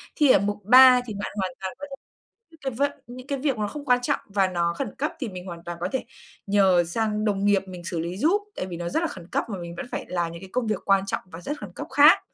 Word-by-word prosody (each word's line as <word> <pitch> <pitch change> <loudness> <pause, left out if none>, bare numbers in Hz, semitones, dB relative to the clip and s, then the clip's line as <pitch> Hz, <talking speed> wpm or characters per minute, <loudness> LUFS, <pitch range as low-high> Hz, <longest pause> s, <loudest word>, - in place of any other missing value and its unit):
Thì 295 -3 +4
ở - - +6
mục 205 +1 -2
3 250 +2 +8
thì 220 - -6
bạn 200 0 -5
hoàn 190 -2 -1
toàn 190 -1 -4
có 285 - -5
thể - - -5 0.6
những 325 - -19
cái 270 -2 -2
vận 280 +4 0 0.2
những 250 +2 -10
cái 280 -2 -2
việc 270 -3 0
nó 210 -1 -1
không 290 +7 -7
quan 250 -2 +4
trọng 245 - 0
và 200 -2 +2
nó 170 -2 0
khẩn 265 -7 -4
cấp, 300 - -1
thì 255 - -3
mình 180 -2 -8
hoàn 170 -2 -8
toàn 175 0 -5
có - - 0
thể 265 - -2 0.4
nhờ 190 -3 +4
sang 215 +4 -1
đồng 200 -1 0
nghiệp 205 -1 +3
mình 180 -2 -9
xử 170 -2 -3
lý 170 +3 -4
giúp, 335 - +2
tại - - -3
vì 175 -2 -6
nó 170 0 -4
rất 320 - 0
là 340 - +1
khẩn 180 - -10
cấp, - - +1
mà 200 - -4
mình 170 0 -7
vẫn - - -4
phải - - -4
làm 170 -2 -1
những 170 - -9
cái 190 - -10
công 250 -2 0
việc 215 -3 0
quan 195 -1 +3
trọng 195 - -2
và 175 -2 -11
rất 290 - -4
khẩn - - -8
cấp - - -6
khác. - - +7
200 Hz, 295 wpm, -25 LUFS, 180-255 Hz, 0.6 s, 3